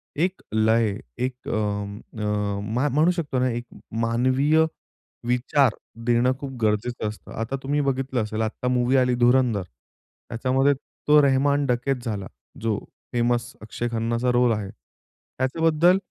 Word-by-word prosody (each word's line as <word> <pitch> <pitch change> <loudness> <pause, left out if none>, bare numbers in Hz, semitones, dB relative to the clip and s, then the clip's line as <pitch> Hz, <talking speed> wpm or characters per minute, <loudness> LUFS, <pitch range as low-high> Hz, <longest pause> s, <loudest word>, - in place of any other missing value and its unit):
एक 180 +5 0
लय, 110 -1 +2 0.2
एक 125 0 -4
अं, 105 -1 -2 0.2
अ, 105 +5 -1
म्हणू 155 +5 +4
शकतो 155 -7 -2
ना, 130 - +2
एक 120 0 -3 0.4
मानवीय 130 +7 +3 0.6
विचार 125 +1 +2 0.3
देणं 120 +1 +3
खूप 140 -1 -5
गरजेचं 110 +2 0
असतं. 105 - -11
आता 115 +4 -3
तुम्ही 145 +2 +1
बघितलं 130 -3 0
असेल, 110 +1 -3
आत्ता 110 +3 -2
मूव्ही 125 +1 +2
आली 125 -1 +3
"धुरंधर." 120 -4 +3
त्याच्यामध्ये 130 - -2
तो 150 +2 +2
रहमान 140 +1 +3
डकेत 125 +1 +1
झाला, 100 -4 -3 0.3
जो 110 -2 0 0.4
फेमस 120 0 +1
अक्षय 110 +2 -4
खन्नाचा 115 +2 0
रोल 125 0 +3
आहे. 105 -2 -3
त्याच्याबद्दल 160 +6 0
125 Hz, 130 wpm, -24 LUFS, 110-135 Hz, 0.6 s, म्हणू